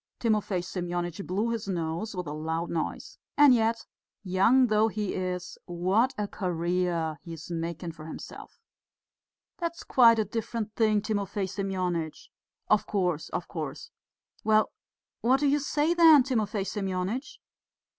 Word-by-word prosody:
Timofey 210 -5 0
Semyonitch 175 0 -3
blew 210 +6 0
his 225 -3 -3
nose 175 +3 -3
with 180 -1 -3
a 150 - -5
loud 160 +2 -3
noise. 165 -2 -4 0.2
"And 290 -3 +8
yet, 230 -1 +1 0.4
young 200 +8 +4
though 215 -1 +3
he 210 -3 -2
is, 180 -1 -4
what 190 +8 +1
a 210 -1 -1
career 175 -4 -1
he 170 - -8
is 160 +2 -9
making 165 0 -4
for 160 -1 -11
himself." - - -9 1.0
"That's 335 -1 -3
quite 230 -3 +6
a 220 - +1
different 220 0 -4
thing, 215 -2 +2
Timofey 205 -2 -1
Semyonitch." 185 -4 -3 0.4
"Of 215 - +3
course, 180 -6 -1
of 175 - -4
course." 155 -6 -6 0.5
"Well, 215 0 +3 0.5
what 255 +3 +3
do 295 - +1
you 285 +1 +3
say 295 +3 +1
then, 325 -5 +8
Timofey 220 -6 -1
Semyonitch?" 195 +6 -3
195 Hz, 140 wpm, -28 LUFS, 175-225 Hz, 1.0 s, And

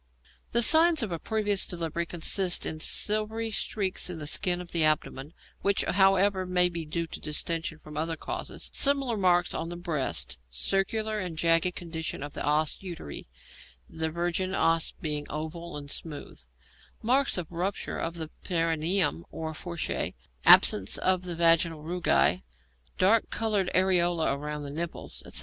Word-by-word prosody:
The 235 +1 +4
signs 320 +1 +6
of 210 - -4
a 170 - -3
previous 210 0 0
delivery 170 -1 -3
consist 175 +2 +1
in 155 - -3
silvery 215 +5 0
streaks 195 -4 -1
in 180 - -5
the 155 - -6
skin 175 +3 +1
of 180 -1 -9
the 165 -2 +2
abdomen, 150 -2 0 0.3
which, 200 0 +1
however, 195 0 +3
may 180 0 +5
be 170 -2 -5
due 165 +2 -3
to 160 - -8
distension 160 +1 -2
from 150 -1 -13
other 160 +1 -2
causes; - - -5
similar 275 -4 +2
marks 180 -3 +2
on 165 - -3
the 175 - -6
breast; 130 - -2
circular 210 - -1
and 180 -5 -5
jagged 165 +2 +2
condition 160 -4 -5
of 145 0 -7
the - - -5
os 150 +1 +1
uteri 170 - -7 0.6
(the 160 0 -3
virgin 175 +3 -2
os 165 -2 +2
being 150 -2 -1
oval 160 +2 -6
and 145 -1 -8
smooth); 150 - -6 0.6
marks 260 +2 +2
of 175 -3 -5
rupture 180 +4 -3
of 165 +1 -3
the 160 -2 -6
perineum 165 - +1
or 160 0 -6
fourchette; 170 +1 -3 0.3
absence 100 -1 +6
of 185 -1 0
the 175 -1 -4
vaginal 165 -2 +3
rugæ; 170 - +2 0.6
dark 210 +4 +3
coloured 210 -5 0
areola 175 -5 +2
round 150 0 -5
the 140 - -6
nipples, 165 +3 -5
etc. - - -1
170 Hz, 155 wpm, -28 LUFS, 155-190 Hz, 0.6 s, signs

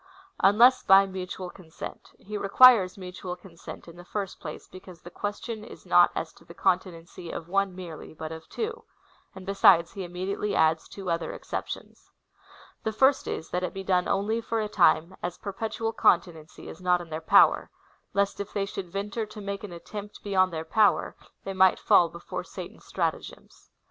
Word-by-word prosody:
Unless 235 +6 +6
by 195 -1 +6
mutual 185 -1 -6
consent. 165 -4 -10
He 210 +2 -9
requires 205 -1 +6
mutual 180 -1 -7
consent, 175 -2 -12
in 170 0 -12
the 175 - -11
first 195 0 -5
place, 150 -3 -8
because 185 -2 -13
the 175 - -11
question 210 +3 -5
is 225 - -12
not - - +6
as - - -4
to - - -20
the - - -14
conti 185 0 +1
nency 170 0 -10
of 165 - -6
one 195 0 0
merely, 175 -4 -9
but 160 0 -6
of 160 0 -9
two; 450 +2 -4 0.5
and 190 -1 -10
besides, 195 -4 +5
he 195 - -6
immedi 185 +2 -4
ately 210 -1 -2
adds 160 0 +2
two 190 -3 -5
other 165 0 -2
exceptions. - - -7 0.7
The 220 - -2
first 265 +5 +3
is, 160 - -4
that 180 - -1
it 180 0 -4
be 195 - -5
done 180 -2 +1
only/or 225 +3 -1
a 215 - -1
time, 180 -3 +3
as 175 0 -4
perpetual 225 +2 -4
continency 170 -6 +1
is 160 - -10
not 180 -1 +3
in 170 -2 -10
their 155 +1 -4
power, - - +5 0.5
lest 200 0 +1
if 200 0 -6
they 200 -1 0
should 195 -2 -6
venture 205 +3 -3
to 215 0 -11
make 200 0 -5
an 205 - -7
attempt 200 +5 -9
beyond 185 -2 +2
their 160 -1 -4
power, 210 +5 +2 0.3
they 195 - -4
might 190 0 +5
fall 170 - +4
before 170 +1 -6
Satan's - - -10
stratagems. - - -4
190 Hz, 185 wpm, -27 LUFS, 175-205 Hz, 0.7 s, Unless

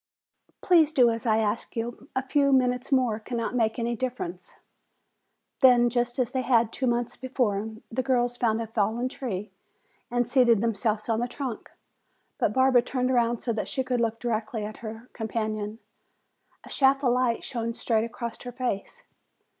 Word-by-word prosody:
"Please 330 -4 +5
do 250 -6 +5
as 230 +2 -4
I 220 -1 +4
ask 220 0 -1
you; 240 +3 -5
a 260 - 0
few 280 +1 +2
minutes 250 0 +2
more 250 -5 +2
cannot 230 +1 -3
make 225 -3 +1
any 235 0 -1
difference." 235 -8 -5 1.0
Then, 245 -2 +6
just 240 0 0
as 250 -2 0
they 260 - 0
had 235 -3 +2
two 260 - -1
months 240 0 0
before, 225 -5 -1 0.2
the 250 +3 0
girls 245 -2 +1
found 230 -2 +1
a 230 - -2
fallen 225 +3 0
tree 215 -7 -5 0.6
and 245 -1 0
seated 245 -2 +4
themselves 215 0 -1
on 225 -1 +1
the 240 - 0
trunk. 250 -2 -6 0.7
But - - +2
Barbara 260 +1 +4
turned 255 +1 -1
around 240 -2 +2
so 235 - -1
that 215 - -3
she 265 - -2
could 250 -2 -1
look 225 -1 0
directly 220 -2 -2
at 215 +1 -7
her 225 +1 -8
companion. 215 -1 -3 0.9
A - - -13
shaft 275 0 +3
of 245 -2 +3
light 250 -2 +1
shone 230 -2 -3
straight 225 -3 +1
across 235 0 -5
her 245 - -6
face. 245 -5 -4
240 Hz, 170 wpm, -27 LUFS, 225-255 Hz, 1.0 s, Then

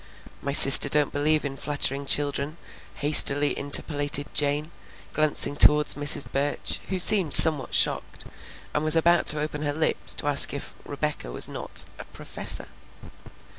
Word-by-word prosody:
"My 140 - -7
sister 140 0 +8
don't 150 0 -2
believe 150 +1 -3
in 135 -1 -9
flattering 140 -1 -4
children," 145 +2 -4 0.4
hastily 145 -1 +2
interpolated 145 0 -1
Jane, 150 +2 -5 0.4
glancing 155 -1 -1
toward 150 0 +2
Mrs. 145 -1 +2
Burch, 140 +2 -6
who 190 - -6
seemed 185 -4 +4
somewhat 150 -6 +4
shocked, - - -4 0.5
and 150 - -5
was 155 +1 +1
about 170 +1 -1
to 150 - +3
open 150 0 -8
her 145 -1 -5
lips 155 +1 -3
to - - -9
ask 145 0 +3
if 140 - -11
Rebecca 145 - -8
was - - -1
not - - -4
a - - -12
"professor." - - -5
145 Hz, 145 wpm, -21 LUFS, 145-155 Hz, 0.5 s, sister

